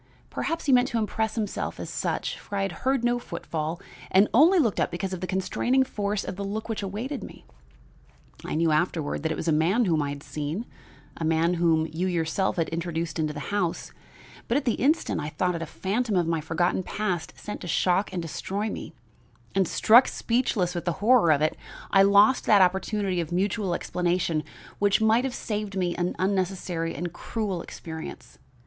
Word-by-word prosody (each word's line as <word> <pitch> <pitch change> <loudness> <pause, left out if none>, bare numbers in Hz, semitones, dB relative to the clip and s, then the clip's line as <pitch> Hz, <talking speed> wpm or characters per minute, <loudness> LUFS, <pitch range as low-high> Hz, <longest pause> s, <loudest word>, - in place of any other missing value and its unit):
Perhaps 330 0 -2
he 285 - +2
meant 250 0 +5
to 235 - -2
impress 220 0 -1
himself 215 -3 -3
as - - -5
such, - - -2
for 205 - -8
I 195 - +1
had 195 - -1
heard 260 +7 0
no 240 0 +2
footfall 165 -4 -4 0.3
and 195 +3 +5
only 320 - +6
looked 235 - +2
up - - +2
because 185 +2 -4
of 185 - -5
the 185 - -3
constraining 240 +8 +1
force 205 -5 -2
of 185 - -6
the 200 - -3
look 210 +2 -4
which 225 -2 -3
awaited 225 +8 -4
me. - - -11 1.0
I - - -3
knew 165 0 +2
afterward 155 -2 0
that 160 +1 -1
it - - -1
was 165 - -5
a - - +4
man 175 +10 +3
whom 160 -5 +2
I 145 - -1
had 140 0 -6
seen, 155 +9 -4 0.5
a - - -4
man 160 +2 +2
whom 165 -2 +2
you 175 +4 -1
yourself 175 +1 0
had 165 -2 0
introduced 165 0 -3
into 155 -1 0
the 150 +6 -6
house; 180 -5 -1 0.6
but 235 - +2
at 295 - -2
the 240 - +2
instant 300 +6 +1
I 150 - -3
thought 180 +3 0
it 165 - -4
a 165 - -4
phantom 215 +5 -1
of 175 -2 +3
my 165 -1 0
forgotten 175 +4 0
past 185 -4 -3
sent 210 - -7
to - - -6
shock 185 +4 +1
and 180 -2 -3
destroy 200 +6 -3
me; - - -7 0.6
and, 195 -2 +2
struck 235 +10 +6
speechless 230 -7 0
with 175 -1 -4
the 175 - +1
horror 210 -3 +4
of 150 0 +3
it, 155 - +1 0.4
I 195 - +6
lost 200 +5 +5
that 205 -3 +7
opportunity 190 0 0
of 165 - -6
mutual 190 0 0
explanation 175 -3 0 0.4
which 205 -1 +3
might 220 +3 +3
have 260 - -3
saved 210 -2 -3
me 180 -2 0
an 175 +1 -1
unnecessary 185 -3 -1
and 175 +3 -4
cruel 205 -6 -3
experience. 160 - -9
185 Hz, 200 wpm, -26 LUFS, 165-215 Hz, 1.0 s, that